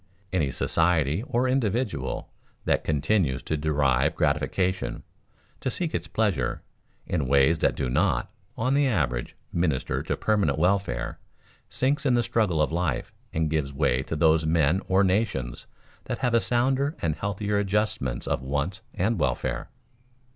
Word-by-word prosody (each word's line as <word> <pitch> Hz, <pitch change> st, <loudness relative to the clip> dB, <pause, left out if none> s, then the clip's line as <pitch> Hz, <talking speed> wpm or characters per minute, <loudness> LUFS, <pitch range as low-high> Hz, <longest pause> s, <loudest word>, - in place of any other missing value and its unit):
Any 80 Hz, -7 st, +1 dB
society 80 Hz, +3 st, +1 dB
or 130 Hz, -2 st, +1 dB
individual 115 Hz, -, -1 dB, 0.4 s
that -, -, +2 dB
continues 75 Hz, -2 st, +1 dB
to 80 Hz, -, -1 dB
derive 75 Hz, -1 st, +1 dB
gratification, 90 Hz, +5 st, 0 dB, 0.6 s
to -, -, -2 dB
seek 165 Hz, +5 st, -1 dB
its -, -, -2 dB
pleasure, 95 Hz, -, 0 dB, 0.4 s
in 75 Hz, -7 st, -1 dB
ways 70 Hz, +4 st, +4 dB
that -, -, +2 dB
do 70 Hz, -, -1 dB
not, 60 Hz, -, +1 dB, 0.3 s
on 130 Hz, +4 st, +1 dB
the 140 Hz, 0 st, +3 dB
average, 65 Hz, -, -1 dB, 0.2 s
minister 80 Hz, -6 st, 0 dB
to -, -, -2 dB
permanent 100 Hz, -10 st, +1 dB
welfare, 85 Hz, -8 st, 0 dB, 0.5 s
sinks 135 Hz, +3 st, 0 dB
in 130 Hz, -4 st, +3 dB
the 120 Hz, -, +3 dB
struggle 95 Hz, -9 st, +1 dB
of -, -, -1 dB
life 80 Hz, -7 st, -1 dB, 0.2 s
and 80 Hz, 0 st, 0 dB
gives 75 Hz, -3 st, -1 dB
way 70 Hz, -3 st, +1 dB
to 75 Hz, -, -4 dB
those 80 Hz, +1 st, +4 dB
men 80 Hz, +3 st, +2 dB
or 95 Hz, +1 st, +4 dB
nations 95 Hz, -, -1 dB, 0.4 s
that -, -, -3 dB
have 125 Hz, -2 st, 0 dB
a 115 Hz, -, +5 dB
sounder 135 Hz, +5 st, +1 dB
and 80 Hz, -2 st, -1 dB
healthier 100 Hz, 0 st, -1 dB
adjustment 100 Hz, -, -1 dB
of -, -, 0 dB
wants 70 Hz, +8 st, -2 dB
and 110 Hz, +5 st, 0 dB
welfare. 65 Hz, -2 st, -1 dB
85 Hz, 145 wpm, -26 LUFS, 70-105 Hz, 0.6 s, a